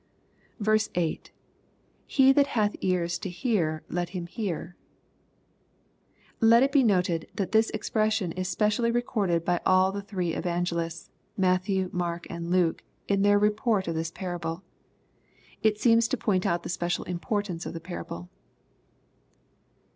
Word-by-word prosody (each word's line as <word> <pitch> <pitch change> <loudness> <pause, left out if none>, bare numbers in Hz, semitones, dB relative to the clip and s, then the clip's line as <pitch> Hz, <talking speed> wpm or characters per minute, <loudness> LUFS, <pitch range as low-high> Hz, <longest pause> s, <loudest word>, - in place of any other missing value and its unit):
6. 215 0 +2
— - - -32
[JBe 170 -3 0 0.9
Ihat 270 +1 +5
hath 210 -5 0
ears 175 -2 0
to 190 - -4
hear 175 -6 -1
let 175 0 -2
him 175 -2 -5
hear^ 180 -3 -4 1.7
Let 230 +2 +6
it 275 - +2
be 280 - +5
noted, 180 -6 +1
that 190 -2 -2
this 220 0 +4
expression 215 -3 0
is 185 +2 -3
specially 210 +5 +1
recorded 205 -8 0
by 175 -1 +1
all 185 0 +4
the 200 +1 -4
thiee 185 -4 -3
evangelists, 170 -1 -2 0.3
Matthew, 185 0 +1
Mark, 175 -1 -2
and 170 0 -5
Luke, 175 -2 +2 0.3
in 200 -1 +2
their 205 0 +5
report 210 -1 +1
of 165 - -1
this 160 0 -2
parable. 175 -1 -5 1.0
It 215 -1 +2
seems 230 -1 +4
to 265 - -1
point 190 -4 +1
out 170 0 0
the - - -6
special 175 0 -1
importance 180 -1 -3
of - - -6
the - - -4
parable. 160 - -7
185 Hz, 140 wpm, -27 LUFS, 175-215 Hz, 1.7 s, Let